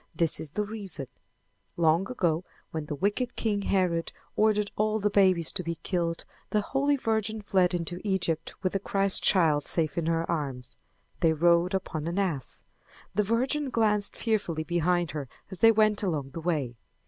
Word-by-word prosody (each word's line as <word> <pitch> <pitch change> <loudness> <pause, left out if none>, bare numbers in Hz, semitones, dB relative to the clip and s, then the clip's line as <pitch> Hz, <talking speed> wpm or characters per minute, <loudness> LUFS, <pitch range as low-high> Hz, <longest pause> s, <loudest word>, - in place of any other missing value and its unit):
This 165 -2 0
is 155 - -5
the 210 +8 -2
reason: 200 -9 -6 0.7
Long 170 +3 +2
ago 175 -8 0 0.3
when 155 -2 -4
the 150 - -3
wicked 205 - -1
king 210 -3 -1
Herod 180 -4 0 0.2
ordered 210 -1 +2
all 215 +1 +1
the 210 -1 0
babies 185 -5 +3
to - - -2
be 170 0 -3
killed, 170 -3 -2 0.2
the 210 - +1
Holy 275 +6 +1
Virgin 220 -4 -1
fled 190 -3 +2
into 175 +1 -4
Egypt 190 -6 -1
with 185 - 0
the 195 - 0
Christ 195 0 +3
child 155 -6 +3
safe 165 0 0
in 165 - -2
her 165 0 +1
arms. 135 -7 -4 0.4
They 160 -1 +3
rode 170 +3 +3
upon 160 -4 -3
an 170 +3 -3
ass. 175 -10 +1 0.5
The 210 - +2
Virgin 260 +7 0
glanced 210 -4 +2
fearfully 200 -8 -1
behind 175 +1 0
her 145 -4 -5 0.2
as 190 - -6
they 225 - +7
went 215 -1 +3
along 150 -9 -2
the 165 - -6
way. 145 -8 -2
180 Hz, 170 wpm, -28 LUFS, 165-210 Hz, 0.7 s, they